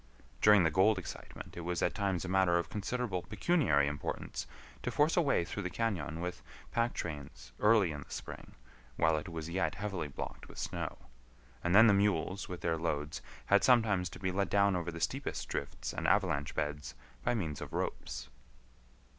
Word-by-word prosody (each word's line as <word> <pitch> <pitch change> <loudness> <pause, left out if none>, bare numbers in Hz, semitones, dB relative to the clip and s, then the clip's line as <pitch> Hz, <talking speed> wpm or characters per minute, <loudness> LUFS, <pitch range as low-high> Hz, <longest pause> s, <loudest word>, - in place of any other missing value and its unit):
During 105 -3 +7
the 80 - +3
gold 95 +6 +4
excitement 90 - -8
it - - -6
was 85 +1 -1
at - - +2
times 95 -4 -1
a - - -4
matter 95 -2 +3
of 85 -2 -2
considerable 105 -2 -2
pecuniary 105 - +2
importance 70 0 -4 0.3
to - - -2
force 150 +2 +3
a 175 - +5
way 140 - +2
through 105 - -4
the 90 - -2
cañon 85 -7 -2
with 90 0 -4 0.3
pack 115 +1 +1
trains 75 -5 -6
early 105 -5 +5
in 75 -1 -6
the - - -13
spring - - -8 0.4
while 80 +2 +3
it 75 +3 -3
was 80 -1 -5
yet 95 +3 0
heavily 100 -6 -3
blocked 70 - -7
with - - -13
snow; - - -3 0.7
and 85 +2 +2
then 110 +2 +10
the 110 - +7
mules 100 -1 +1
with 90 -1 -6
their 80 -1 0
loads 75 -3 -2 0.2
had 100 0 +4
sometimes 110 -8 +4
to - - -10
be 95 -1 -1
let 100 0 0
down 100 0 +4
over 85 -1 -2
the 85 - -7
steepest - - -2
drifts - - -4
and - - -2
avalanche 80 -8 +2
beds 75 -4 -3 0.3
by - - +1
means 80 - -3
of - - -6
ropes. - - -3
90 Hz, 190 wpm, -33 LUFS, 80-105 Hz, 0.7 s, then